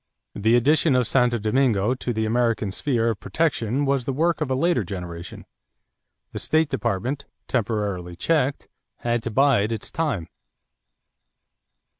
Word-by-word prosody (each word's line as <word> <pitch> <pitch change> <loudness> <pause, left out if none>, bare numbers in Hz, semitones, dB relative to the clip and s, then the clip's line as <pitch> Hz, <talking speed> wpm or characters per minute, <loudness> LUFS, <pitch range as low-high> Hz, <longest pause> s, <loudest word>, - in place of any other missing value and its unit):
The 110 +3 +2
addition 145 +4 +3
of 125 -1 +3
Santo 120 0 +2
Domingo 110 -1 +2
to 130 -1 -3
the 110 -1 -1
American 115 -2 +1
sphere 115 +1 0
of 105 - -6
protection 140 -4 0
was 135 -3 0
the 135 - -1
work 165 +5 +1
of 150 - -1
a 130 - +1
later 140 -4 +2
generation. 90 -2 -7 0.9
The - - -5
State 155 -1 +1
Department, 125 +2 -2 0.2
temporarily 100 -7 -2
checked, 145 - 0 0.3
had 120 -1 0
to 115 - -3
bide 120 -3 +3
its 110 -2 -5
time. 145 - -2
120 Hz, 140 wpm, -24 LUFS, 105-140 Hz, 0.9 s, addition